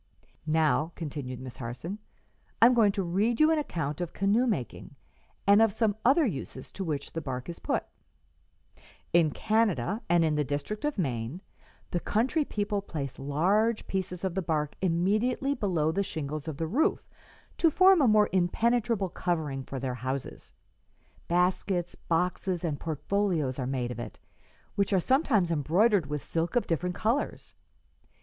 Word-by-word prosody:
"Now," 160 Hz, +1 st, +2 dB
continued 140 Hz, -6 st, -5 dB
Miss 130 Hz, -1 st, -8 dB
Harson, 130 Hz, -, -6 dB, 0.6 s
"I -, -, +8 dB
am 250 Hz, -, +7 dB
going 220 Hz, -4 st, +4 dB
to 195 Hz, -2 st, -1 dB
read 200 Hz, +7 st, 0 dB
you 310 Hz, +1 st, +6 dB
an 320 Hz, -, +3 dB
account 160 Hz, -, -3 dB
of 175 Hz, -, -4 dB
canoe 210 Hz, +6 st, +2 dB
making, 145 Hz, -, -3 dB, 0.5 s
and 200 Hz, +2 st, +6 dB
of 225 Hz, -2 st, +5 dB
some 210 Hz, 0 st, +1 dB
other 290 Hz, +6 st, +5 dB
uses 135 Hz, -, -5 dB
to 195 Hz, -, -5 dB
which 150 Hz, -5 st, -4 dB
the 165 Hz, -, -3 dB
bark 130 Hz, -3 st, -5 dB
is 170 Hz, -, -7 dB
put: -, -, -1 dB, 1.3 s
"'In 170 Hz, -2 st, +5 dB
Canada 215 Hz, -, 0 dB
and 170 Hz, -1 st, +4 dB
in 155 Hz, -, +1 dB
the 150 Hz, 0 st, +1 dB
district 145 Hz, -, -3 dB
of 295 Hz, -4 st, -1 dB
Maine 130 Hz, -, -2 dB, 0.5 s
the 175 Hz, -, 0 dB
country 250 Hz, -, +1 dB
people 205 Hz, -5 st, -2 dB
place 145 Hz, -9 st, -6 dB
large 190 Hz, +11 st, +1 dB
pieces 185 Hz, -2 st, -3 dB
of 190 Hz, -2 st, -1 dB
the 190 Hz, -, -1 dB
bark 150 Hz, -3 st, -1 dB
immediately 210 Hz, +10 st, +1 dB
below 180 Hz, -, 0 dB
the 195 Hz, +5 st, 0 dB
shingles 155 Hz, -4 st, -4 dB
of 155 Hz, -3 st, -4 dB
the 165 Hz, -, -1 dB
roof, 250 Hz, -, 0 dB, 0.5 s
to 330 Hz, -, +5 dB
form 370 Hz, +2 st, +6 dB
a 265 Hz, -, +5 dB
more 210 Hz, -1 st, +5 dB
impenetrable 210 Hz, +2 st, +1 dB
covering 160 Hz, -7 st, -2 dB
for 135 Hz, 0 st, -6 dB
their 130 Hz, -1 st, -2 dB
houses. 130 Hz, +2 st, -5 dB, 0.7 s
Baskets, 180 Hz, 0 st, +1 dB
boxes 180 Hz, +1 st, -1 dB
and 155 Hz, -4 st, -2 dB
portfolios 160 Hz, -3 st, -1 dB
are 125 Hz, -, -2 dB
made 125 Hz, -2 st, -2 dB
of 120 Hz, -, -6 dB
it, 120 Hz, -2 st, -7 dB, 0.6 s
which 200 Hz, 0 st, 0 dB
are 190 Hz, -, +4 dB
sometimes 230 Hz, -, +2 dB
embroidered 170 Hz, -, +2 dB
with 150 Hz, 0 st, -4 dB
silk 165 Hz, +6 st, -2 dB
of 245 Hz, -, +2 dB
different 180 Hz, +2 st, -1 dB
colors. 235 Hz, +6 st, -1 dB
175 Hz, 160 wpm, -28 LUFS, 150-215 Hz, 1.3 s, I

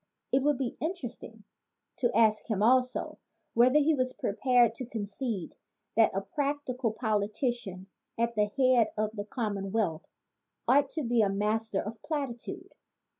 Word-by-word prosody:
It 265 Hz, -, +3 dB
would 290 Hz, 0 st, +2 dB
be 260 Hz, -3 st, -3 dB
interesting 245 Hz, -, -5 dB, 0.5 s
to 240 Hz, -2 st, +1 dB
ask 220 Hz, 0 st, +3 dB
him 210 Hz, -2 st, +1 dB
also 255 Hz, +2 st, +2 dB, 0.3 s
whether 250 Hz, +5 st, +5 dB
he 300 Hz, +2 st, +4 dB
was 255 Hz, -3 st, 0 dB
prepared 240 Hz, +2 st, +2 dB
to 250 Hz, +2 st, -6 dB
concede 215 Hz, -3 st, -4 dB, 0.4 s
that 225 Hz, 0 st, +6 dB
a 195 Hz, -, 0 dB
practical 260 Hz, +1 st, -2 dB
politician 215 Hz, -2 st, -2 dB, 0.3 s
at 235 Hz, 0 st, +1 dB
the 210 Hz, -2 st, +2 dB
head 255 Hz, 0 st, +3 dB
of 215 Hz, 0 st, 0 dB
the 205 Hz, -1 st, -4 dB
commonwealth 205 Hz, -5 st, -2 dB, 0.6 s
ought 275 Hz, +1 st, +4 dB
to 310 Hz, -, 0 dB
be 235 Hz, -1 st, +2 dB
a 205 Hz, -, +3 dB
master 210 Hz, +1 st, 0 dB
of 215 Hz, +1 st, -7 dB
plati 285 Hz, -6 st, -2 dB
tude. 365 Hz, +10 st, -9 dB
230 Hz, 145 wpm, -29 LUFS, 210-260 Hz, 0.6 s, that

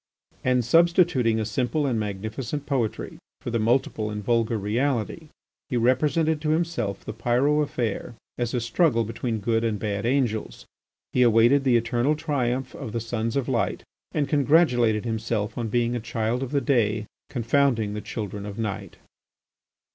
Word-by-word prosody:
And 125 Hz, -2 st, +2 dB
substituting 165 Hz, -6 st, +4 dB
a 110 Hz, -, -1 dB
simple 125 Hz, +7 st, 0 dB
and 125 Hz, -5 st, 0 dB
magnificent 110 Hz, +7 st, -4 dB
poetry 125 Hz, -7 st, -2 dB, 0.2 s
for 120 Hz, -, -5 dB
the 115 Hz, -, 0 dB
multiple 110 Hz, -1 st, +1 dB
and 105 Hz, 0 st, -5 dB
vulgar 115 Hz, 0 st, +1 dB
reality, 120 Hz, +8 st, -1 dB, 0.4 s
he 125 Hz, -, 0 dB
represented 150 Hz, +6 st, +2 dB
to 155 Hz, -, -1 dB
himself 155 Hz, -, -1 dB
the -, -, -5 dB
Pyrot 125 Hz, +6 st, +2 dB
affair 120 Hz, -5 st, -3 dB, 0.2 s
as 120 Hz, 0 st, -2 dB
a 120 Hz, -, 0 dB
struggle 120 Hz, +1 st, +2 dB
between 115 Hz, +1 st, -3 dB
good 115 Hz, +2 st, 0 dB
and 110 Hz, -2 st, 0 dB
bad 100 Hz, +1 st, -2 dB
angels. 120 Hz, -5 st, -1 dB, 0.5 s
He 125 Hz, -, +3 dB
awaited 120 Hz, +4 st, +5 dB
the 125 Hz, -3 st, +4 dB
eternal 120 Hz, +5 st, +1 dB
triumph 130 Hz, -4 st, -1 dB
of 110 Hz, -, -7 dB
the 115 Hz, -, -1 dB
Sons 115 Hz, 0 st, -3 dB
of 140 Hz, -3 st, 0 dB
Light 125 Hz, -4 st, -1 dB, 0.3 s
and 145 Hz, -2 st, 0 dB
congratulated 130 Hz, -7 st, +3 dB
himself 110 Hz, -1 st, -2 dB
on 120 Hz, -2 st, -2 dB
being 120 Hz, +2 st, 0 dB
a -, -, -1 dB
Child 115 Hz, +1 st, -2 dB
of 135 Hz, -, -3 dB
the 140 Hz, 0 st, 0 dB
Day 110 Hz, -7 st, +1 dB, 0.2 s
confounding 120 Hz, -3 st, +1 dB
the 105 Hz, -, -4 dB
Children 105 Hz, -2 st, -5 dB
of 100 Hz, -, -7 dB
Night. 110 Hz, -4 st, -4 dB
120 Hz, 160 wpm, -25 LUFS, 110-135 Hz, 0.5 s, awaited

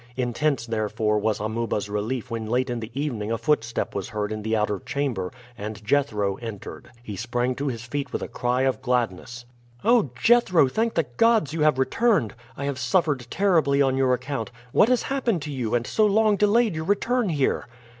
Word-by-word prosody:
Intense, 125 Hz, +1 st, 0 dB
therefore, 110 Hz, -1 st, 0 dB
was 105 Hz, 0 st, 0 dB
Amuba's 110 Hz, 0 st, -2 dB
relief 110 Hz, +5 st, -3 dB
when 115 Hz, -1 st, -3 dB
late 125 Hz, +3 st, 0 dB
in 120 Hz, -, -2 dB
the 110 Hz, -1 st, -6 dB
evening 115 Hz, -8 st, -2 dB
a 115 Hz, -, 0 dB
footstep 115 Hz, -5 st, 0 dB
was 100 Hz, 0 st, -4 dB
heard 105 Hz, -2 st, -3 dB
in 110 Hz, 0 st, -4 dB
the 110 Hz, +1 st, 0 dB
outer 105 Hz, -2 st, 0 dB
chamber, 125 Hz, -7 st, -2 dB, 0.2 s
and 105 Hz, 0 st, -7 dB
Jethro 105 Hz, -7 st, +1 dB
entered. 115 Hz, -4 st, -8 dB
He 105 Hz, -4 st, -6 dB
sprang 120 Hz, +4 st, -1 dB
to 145 Hz, -, -2 dB
his 115 Hz, -4 st, -3 dB
feet 140 Hz, +2 st, -4 dB
with -, -, -3 dB
a -, -, -4 dB
cry 125 Hz, +1 st, 0 dB
of 135 Hz, -1 st, 0 dB
gladness. 120 Hz, -1 st, -2 dB, 0.4 s
"Oh, 230 Hz, -, +4 dB
Jethro! 185 Hz, -, +5 dB
thank 225 Hz, -, -1 dB
the 165 Hz, -, +2 dB
gods 225 Hz, -, +3 dB
you 160 Hz, -, -2 dB
have 150 Hz, -3 st, +4 dB
returned. 165 Hz, -, +2 dB, 0.2 s
I 140 Hz, -, -3 dB
have 140 Hz, -2 st, -3 dB
suffered 150 Hz, -9 st, +1 dB
terribly 160 Hz, -8 st, +2 dB
on 135 Hz, -2 st, +3 dB
your 130 Hz, -1 st, +3 dB
account. 135 Hz, -3 st, -4 dB, 0.2 s
What 215 Hz, -, +4 dB
has 250 Hz, -1 st, +2 dB
happened 240 Hz, -, -1 dB
to 150 Hz, -, -5 dB
you, 125 Hz, -5 st, -1 dB
and 120 Hz, 0 st, 0 dB
so 215 Hz, +8 st, +2 dB
long 215 Hz, +1 st, +3 dB
delayed 210 Hz, +1 st, +3 dB
your 160 Hz, 0 st, -4 dB
return 225 Hz, +4 st, +1 dB
here?" 145 Hz, -5 st, 0 dB
130 Hz, 195 wpm, -24 LUFS, 110-155 Hz, 0.4 s, Jethro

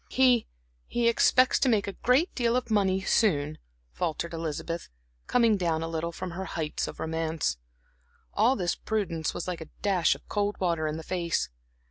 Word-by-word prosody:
"He 250 Hz, -3 st, +4 dB, 0.4 s
he 240 Hz, -1 st, +1 dB
expects 255 Hz, +2 st, +4 dB
to 265 Hz, -, +3 dB
make 215 Hz, -4 st, +2 dB
a 200 Hz, -, -4 dB
great 260 Hz, -, +2 dB
deal 235 Hz, -2 st, +1 dB
of 250 Hz, -2 st, -1 dB
money 190 Hz, -2 st, +2 dB
soon," 155 Hz, -7 st, +1 dB, 0.3 s
faltered 160 Hz, -, -3 dB
Elizabeth, 165 Hz, +1 st, -4 dB, 0.4 s
coming 230 Hz, -4 st, +4 dB
down 165 Hz, -3 st, 0 dB
a -, -, -2 dB
little 165 Hz, +1 st, -2 dB
from 180 Hz, +1 st, -6 dB
her 190 Hz, +3 st, -5 dB
heights 155 Hz, -4 st, -3 dB
of -, -, -8 dB
romance. 160 Hz, -, -1 dB, 0.8 s
All 235 Hz, +5 st, +4 dB
this 180 Hz, -5 st, 0 dB
prudence 180 Hz, -8 st, -2 dB
was -, -, -4 dB
like 180 Hz, -2 st, -3 dB
a 160 Hz, -, -8 dB
dash 190 Hz, -5 st, +3 dB
of -, -, -16 dB
cold 205 Hz, 0 st, -1 dB
water 170 Hz, -4 st, 0 dB
in 155 Hz, +1 st, -3 dB
the 160 Hz, -, -7 dB
face. 170 Hz, -1 st, -1 dB
180 Hz, 175 wpm, -28 LUFS, 165-220 Hz, 0.8 s, He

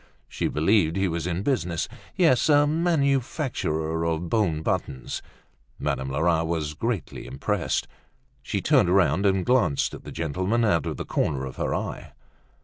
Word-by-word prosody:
She -, -, -2 dB
believed 80 Hz, +1 st, +2 dB
he 95 Hz, 0 st, +1 dB
was 85 Hz, 0 st, -2 dB
in 90 Hz, +2 st, -2 dB
business; 90 Hz, -11 st, 0 dB, 0.3 s
yes, 160 Hz, -6 st, +3 dB
a 145 Hz, -1 st, +6 dB
manufacturer 135 Hz, -, 0 dB
of 85 Hz, +1 st, -1 dB
bone 85 Hz, -8 st, +1 dB
buttons. 65 Hz, -5 st, -2 dB, 0.6 s
Madame 65 Hz, 0 st, -2 dB
Lerat 80 Hz, +4 st, +1 dB
was 80 Hz, -3 st, -2 dB
greatly 110 Hz, +4 st, -3 dB
impressed. 65 Hz, -, -1 dB, 0.5 s
She -, -, -2 dB
turned 90 Hz, -, +4 dB
round 95 Hz, 0 st, +3 dB
and 95 Hz, -1 st, +1 dB
glanced 110 Hz, -, +2 dB
at -, -, -9 dB
the -, -, -8 dB
gentleman 95 Hz, +9 st, 0 dB
out 85 Hz, -6 st, +2 dB
of -, -, -3 dB
the -, -, -4 dB
corner 70 Hz, -3 st, -1 dB
of 65 Hz, -, -8 dB
her -, -, -1 dB
eye. -, -, -5 dB
90 Hz, 150 wpm, -25 LUFS, 80-115 Hz, 0.6 s, a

